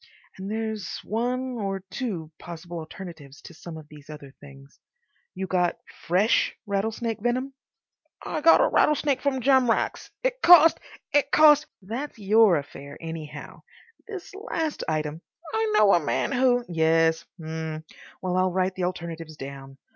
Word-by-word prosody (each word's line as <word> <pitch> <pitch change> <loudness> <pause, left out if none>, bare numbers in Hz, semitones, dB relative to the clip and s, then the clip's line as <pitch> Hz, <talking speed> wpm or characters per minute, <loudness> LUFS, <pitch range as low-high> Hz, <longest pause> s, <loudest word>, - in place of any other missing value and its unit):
And 190 +1 -5
there's 220 -3 -4
one 245 +3 -2
or 195 -2 -3
two 185 - -4
possible 170 0 -8
alternatives 160 -4 -10
to - - -11
some 160 0 -9
of 155 -2 -12
these 150 -1 -15
other 145 -3 -10
things. 140 -1 -15 0.6
You 190 +1 -3
got 180 -2 0 0.3
FRESH 190 +6 +2
rattlesnake 220 +2 -2
venom." 255 +4 -1 0.7
"I 310 - -3
got 330 +2 +7
a - - +4
rattlesnake 295 -2 +2
from 270 -2 0
Jamrach's. 260 -2 +2
It - - -1
cost—it 320 -4 +5
cost—" 305 0 +6 0.2
"That's 235 +10 -5
your 210 -1 +5
affair, 140 0 -8
anyhow. 160 -2 -8 0.5
This 390 -5 -8
last 330 -7 -3
item—" 155 0 -2 0.3
"I 220 -1 0
know 210 -2 +6
a 175 - +5
man 145 - -1
who—" 245 -2 +2
"Yes. 165 0 +2 0.2
H'm. 160 -1 -5 0.4
Well, 180 0 -1
I'll 185 0 +2
write 185 +1 0
the 185 -1 -2
alternatives 165 -3 -6
down. 135 -1 -9
190 Hz, 140 wpm, -25 LUFS, 160-245 Hz, 0.7 s, got